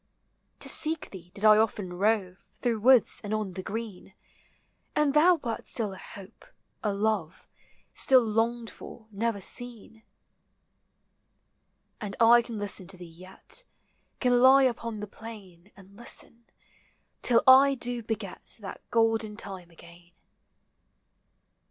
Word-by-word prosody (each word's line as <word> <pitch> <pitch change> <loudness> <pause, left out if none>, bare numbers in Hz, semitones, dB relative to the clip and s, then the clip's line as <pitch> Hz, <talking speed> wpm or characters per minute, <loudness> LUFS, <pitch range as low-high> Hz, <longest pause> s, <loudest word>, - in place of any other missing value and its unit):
To - - +4
seek 320 +1 +2
thee 180 -3 -12
did 200 - -10
1 215 0 +7
often 205 -4 -1
rove 195 -1 -1
Through 235 -3 -2
woods 250 +1 +4
and 210 +1 -2
on 210 -4 -4
the 185 - -6
green; 205 -2 -7 0.8
And 300 -2 +2
thou 340 +4 +5
wert 235 -8 -6
still 215 -4 0
a - - -10
hope, 195 -1 -13 0.4
a 210 - 0
love; 200 -5 -2 0.5
Still 260 -2 +4
longed 225 +1 -1
for. 230 - -12
never 215 +1 -2
seen. 225 +1 -3 2.0
And 205 -3 -6
I 235 +1 +6
can 235 -1 -8
listen 200 -3 -3
to 190 0 -3
thee 175 - -10
yet; 185 - -6 0.6
Can 245 -1 +2
lie 265 +1 +7
upon 230 -4 -2
the 210 - -6
plain 205 -4 -13
And 195 0 -17
listen, 235 +1 -6 0.8
till 235 -2 +3
1 270 +1 +7
do 245 -1 -2
begel 215 -3 -5 0.2
That 205 -4 -9
golden 225 -2 +1
time 190 -3 -8
again. 170 +1 -18
220 Hz, 135 wpm, -27 LUFS, 195-235 Hz, 2.0 s, 1